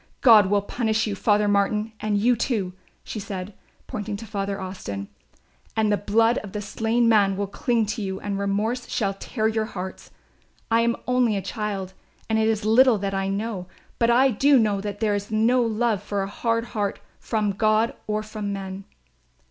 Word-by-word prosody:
God 220 -6 +7
will 200 0 +2
punish 220 0 0
you, 210 - -2
Father 210 +1 +2
Martin, 210 +2 +1
and 210 -1 0
you, 240 +4 +3
too," 210 -6 -1 0.3
she 215 - -6
said, 195 0 -6 0.3
pointing 210 -1 -4
to 225 - -8
Father 200 -1 -3
Austin, 100 - -6 0.7
"and 215 -1 +2
the - - +4
blood 225 +4 +2
of 200 -3 -10
the 210 - -3
slain 225 +3 +1
man 200 -4 +4
will 200 - 0
cling 230 +3 0
to 215 +2 -3
you 190 -1 -3
and 200 -1 -3
remorse 215 +5 -1
shall 200 -3 0
tear 215 +3 -2
your 220 0 0
hearts. 190 -3 -7 0.6
I 230 0 +4
am 235 0 +2
only 250 -3 +2
a - - -2
child 200 -4 -4 0.3
and 220 0 +1
it 220 - +2
is 220 -2 0
little 235 +2 +5
that 195 0 -3
I 195 0 -1
know, 195 -2 -3 0.3
but 235 -1 +3
I 260 +3 +5
do 275 +6 +4
know 210 -4 +2
that 205 +1 -5
there 215 -2 +2
is 205 0 -3
no 225 +4 +3
love 225 -2 0
for 205 -1 -2
a - - -3
hard 230 +3 -1
heart 205 -2 -1 0.2
from 215 -2 -1
God 215 +3 +2
or 215 0 -1
from 215 -1 -5
men. 195 0 -6
210 Hz, 190 wpm, -24 LUFS, 200-225 Hz, 0.7 s, God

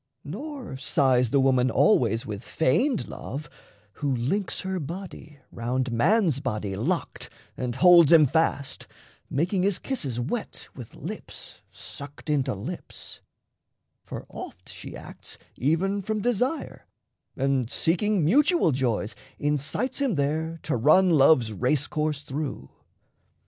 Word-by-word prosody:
Nor 255 - -6
sighs 130 -4 +2
the 140 - +3
woman 130 -1 +3
always 115 - +3
with 105 -1 -5
feigned 230 - +1
love, 145 +2 -6 0.5
Who 145 -2 +1
links 160 - -1
her 190 0 -3
body 165 -1 -8
round 125 +2 -2
man's 160 - +3
body 105 -7 -3
locked 160 - -2 0.3
And 125 -2 -3
holds 170 0 +7
him 160 -3 +8
fast, 145 -1 0 0.4
making 175 +7 0
his 195 0 +2
kisses 140 - -3
wet 185 - -4
With 125 -5 -10
lips - - -8
sucked 145 +2 -7
into 135 -4 +1
lips; 100 - -8 0.8
for - - -7
oft - - -9
she - - -8
acts - - -9 0.2
Even 180 - +1
from 215 +2 -2
desire, 245 +6 -1 0.5
and, 135 -3 +1
seeking 180 +4 +1
mutual 295 - +4
joys, 120 -5 -1 0.2
Incites 150 - -1
him 265 -8 +1
there 160 +3 -1
to 155 - -1
run 155 +10 +5
love's 135 -7 +5
race 125 +7 +1
course 150 -1 -2
through. 140 - -5
150 Hz, 125 wpm, -26 LUFS, 130-185 Hz, 0.8 s, him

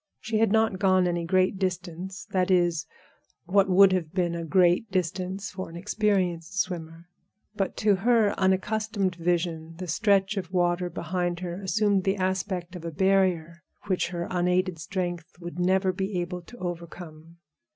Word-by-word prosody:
She 220 -1 -1
had 225 -3 +3
not 220 -3 +2
gone 185 -2 +3
any 175 -1 -1
great 185 +2 +2
distance—that 185 0 -2
is, 175 -3 +2 0.6
what 195 +2 +3
would 190 +1 +7
have 170 -2 -2
been 175 -3 +1
a 170 0 -3
great 180 +4 +3
distance 185 +1 -2
for 185 -2 -6
an 165 - -11
experienced 190 -2 -1
swimmer. 165 -3 -4 0.5
But 195 -2 -2
to 205 -2 +5
her 225 0 +3
unaccustomed 195 +1 0
vision 165 -1 -2
the 185 - -5
stretch 200 +3 +2
of 180 -2 -4
water 175 -1 +1
behind 175 +1 -2
her 180 +1 -5
assumed 200 +1 +1
the 195 +1 +1
aspect 185 -1 -2
of 175 - -8
a 170 - -3
barrier 180 -2 +1 0.2
which 185 -3 0
her 175 -1 -4
unaided 180 -1 +1
strength 175 0 -4
would 175 0 -7
never 185 +1 +2
be 190 0 -2
able 180 +1 -4
to 245 +8 -14
overcome. 170 -3 -8
185 Hz, 155 wpm, -26 LUFS, 175-195 Hz, 0.6 s, would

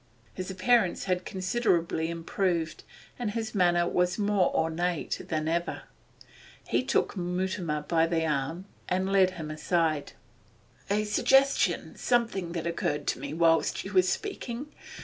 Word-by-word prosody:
His 185 0 -5
appearance 190 +1 +2
had 185 -1 -1
considerably 180 -5 0
improved, 170 0 -2 0.4
and 240 -3 -1
his 220 +1 -3
manner 175 -3 +3
was 180 0 +1
more 205 -3 +2
ornate 165 +1 -1
than 155 -1 -1
ever. 170 +1 -1 0.8
He - - +1
took - - 0
Mutimer 180 -3 -2
by 165 +1 +2
the 165 -1 0
arm 155 +4 -2 0.2
and 185 +1 0
led 190 -2 +5
him 155 -2 -5
aside. 155 -1 0 0.8
'A 210 +1 +2
suggestion 270 +6 +2
something 225 -8 0
that 170 -2 -3
occurred 150 -3 -1
to - - -1
me 140 +3 -5
whilst 165 0 +2
you 195 - -7
were 185 - +7
speaking. 260 - -4
180 Hz, 135 wpm, -28 LUFS, 165-200 Hz, 0.8 s, were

